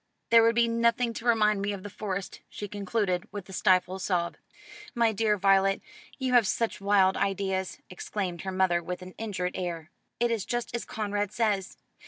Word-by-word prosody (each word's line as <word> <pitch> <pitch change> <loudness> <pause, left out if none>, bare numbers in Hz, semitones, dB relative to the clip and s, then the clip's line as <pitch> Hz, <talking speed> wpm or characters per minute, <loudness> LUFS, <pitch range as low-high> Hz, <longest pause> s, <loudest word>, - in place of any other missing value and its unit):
There 230 0 +8
would 230 0 +4
be 235 0 +4
nothing 230 +1 +1
to 230 - -6
remind 215 -3 +3
me 205 +1 -1
of 190 -2 -7
the - - -5
Forest," 195 -2 -4
she 205 - -6
concluded 200 -2 -1
with 205 -2 -7
a - - -9
stifled 185 0 +2
sob. 175 -2 0 0.6
"My 230 -2 +3
dear 215 0 +1
Violet, 195 0 +3 0.4
you 260 -2 -1
have 240 -4 +5
such 230 -1 -1
wild 195 -1 +4
ideas," 190 -1 -1
exclaimed 180 -1 -4
her 190 - -4
mother 185 -2 +2
with 180 +1 -5
an 185 0 -10
injured 190 -5 -2
air. 170 -2 -4 0.3
"It 240 0 +2
is 225 -4 0
just 240 -1 -3
as 235 - -3
Conrad 205 -2 -2
says. 210 -4 -1
200 Hz, 185 wpm, -28 LUFS, 185-225 Hz, 0.6 s, There